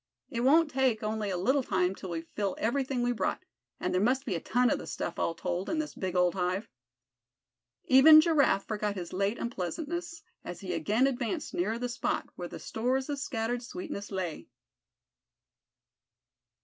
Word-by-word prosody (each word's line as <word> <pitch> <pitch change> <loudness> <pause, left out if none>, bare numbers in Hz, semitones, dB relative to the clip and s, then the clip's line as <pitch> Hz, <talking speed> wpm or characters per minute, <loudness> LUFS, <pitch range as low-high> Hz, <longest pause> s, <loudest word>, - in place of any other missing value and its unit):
It 235 - -2
won't 300 +5 +4
take 255 -5 +1
only 215 -1 -2
a 185 - -1
little 260 +10 +2
time 185 -6 +1
till 190 -1 -8
we 165 -1 -3
fill 195 +2 -3
everything 255 +2 0
we 245 - +2
brought, 240 - -2 0.3
and - - -1
there 185 - +2
must 260 +5 +2
be 220 - -1
a 170 - -1
ton 245 +7 +2
of - - +1
the - - -8
stuff, - - -4
all 165 - 0
told, 180 +1 -3
in 325 - -1
this 310 -1 -2
big 185 -1 -4
old 180 -1 +3
hive." 185 +3 -1 1.2
Even 305 +4 +9
Giraffe 285 - +3
forgot 210 -1 -2
his 175 -3 -6
late 200 +4 0
unpleasantness 325 - -4 0.2
as 175 - -7
he 185 -2 -4
again 210 - +2
advanced 270 +4 -2
nearer 345 -10 0
the 245 +1 -2
spot 240 0 -2
where 175 - -5
the - - -8
stores 260 +4 -1
of 285 -1 -2
scattered 240 -3 -2
sweetness 260 - -6
lay. 185 -5 -4
230 Hz, 175 wpm, -30 LUFS, 190-265 Hz, 1.2 s, Even